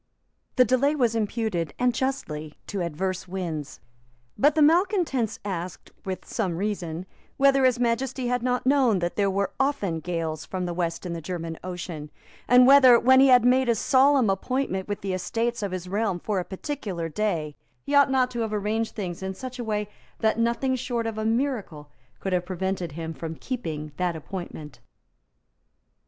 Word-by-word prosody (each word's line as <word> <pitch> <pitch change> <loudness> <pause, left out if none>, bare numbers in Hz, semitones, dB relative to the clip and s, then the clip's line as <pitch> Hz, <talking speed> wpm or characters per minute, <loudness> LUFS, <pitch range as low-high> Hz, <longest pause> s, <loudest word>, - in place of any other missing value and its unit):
The 255 - +6
delay 260 +5 +2
was 240 -6 +2
imputed, 210 - -2
and 245 0 +2
justly, 155 - -3
to 200 - -4
adverse 185 +3 -3
winds. 170 -6 -5 0.6
But 290 +2 +3
the 310 - +5
malecontents 320 - +2
asked, 180 -3 -5
with 190 -1 -4
some 185 -7 -2
reason, 185 -4 -3 0.3
whether 275 -1 +4
His 250 -1 +3
Majesty 250 +2 0
had 245 0 0
not 250 0 0
known 260 -6 +4
that 175 -1 -2
there 200 -1 +2
were 195 0 -1
often 270 - 0
gales 160 -2 -3
from 185 -1 -4
the 175 - -3
West 170 0 -2
in 175 - -3
the 165 - -5
German 165 -1 -5
Ocean, 175 -4 -6 0.4
and 250 0 +7
whether, 260 -3 +8
when 260 +1 +6
he 270 - +7
had 250 -2 +6
made 255 0 +4
a 235 - +4
solemn 260 -1 +4
appointment 195 -1 -2
with 205 -1 -4
the 195 -1 -2
Estates 230 +5 -2
of 200 -2 -2
his 185 -1 -5
Realm 200 -1 0
for 205 +1 -1
a 180 - -3
particular 195 - -4
day, 165 -4 -2 0.3
he 285 - -3
ought 285 -1 +6
not 260 -1 +2
to 240 - -4
have 220 -2 -2
arranged 215 +2 -1
things 180 -5 -4
in 190 0 -4
such 255 +2 -7
a - - -2
way 210 -2 -2 0.3
that 220 0 +1
nothing 235 +3 +1
short 240 -2 -2
of 225 -1 -3
a 215 - -2
miracle 220 - -2 0.3
could 195 - -3
have 180 -1 0
prevented 185 -3 -3
him 165 +1 -5
from 165 0 -6
keeping 160 - -5
that 180 -2 0
appointment. 155 -5 -7
210 Hz, 180 wpm, -25 LUFS, 175-250 Hz, 0.6 s, whether